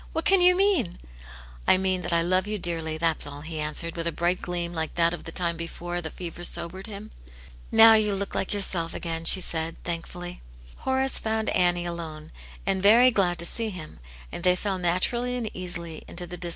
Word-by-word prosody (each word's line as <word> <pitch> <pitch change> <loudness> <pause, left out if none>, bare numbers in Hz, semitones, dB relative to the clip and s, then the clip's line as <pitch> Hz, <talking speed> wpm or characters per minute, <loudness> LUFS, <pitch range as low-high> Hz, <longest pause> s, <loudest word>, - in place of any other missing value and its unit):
" - - -20
What 325 - -2
can 390 -1 +5
you 360 0 +6
mean 370 - +2 0.2
} - - -14
" - - -19
I - - +6
mean 185 -1 0
that - - -4
I 170 0 +2
love 185 +3 +1
you 210 0 -2
dearly, 165 -3 -2
that's 165 -2 +1
all," 145 0 -8
he 160 +1 -6
an 150 0 -2
swered, 165 -1 -3
with 165 0 -2
a - - 0
bright 175 +2 0
gleam 175 -1 -3
like 160 -2 -3
that 170 0 +3
of 175 - -7
the 165 - -6
time 170 -1 -1
before 175 +1 -5
the 160 - -5
fever 175 0 -8
sobered 185 +3 0
him. 210 0 -9 0.6
"Now 225 0 +9
you 210 -2 +3
look 200 0 -4
like - - -2
yourself 185 -5 -1
again," 165 -1 -4
she 190 - +7
said, 165 -1 -2
thankfully. 175 +1 -6 0.4
Horace 265 0 0
found 220 0 -1
Annie 175 -1 +2
alone, 160 -2 -6 0.3
and 190 0 0
very 235 +6 +7
glad 180 -5 +1
to 170 - -1
sec 220 +3 0
him, 155 - -9 0.3
and 175 - -6
they 180 0 +4
fell 190 0 -2
naturally 235 +8 0
and 230 -4 -3
easily 170 -3 -4
into 175 0 -6
tUe. 175 +1 -8
d\s. 175 0 -3
175 Hz, 220 wpm, -26 LUFS, 165-200 Hz, 0.6 s, Now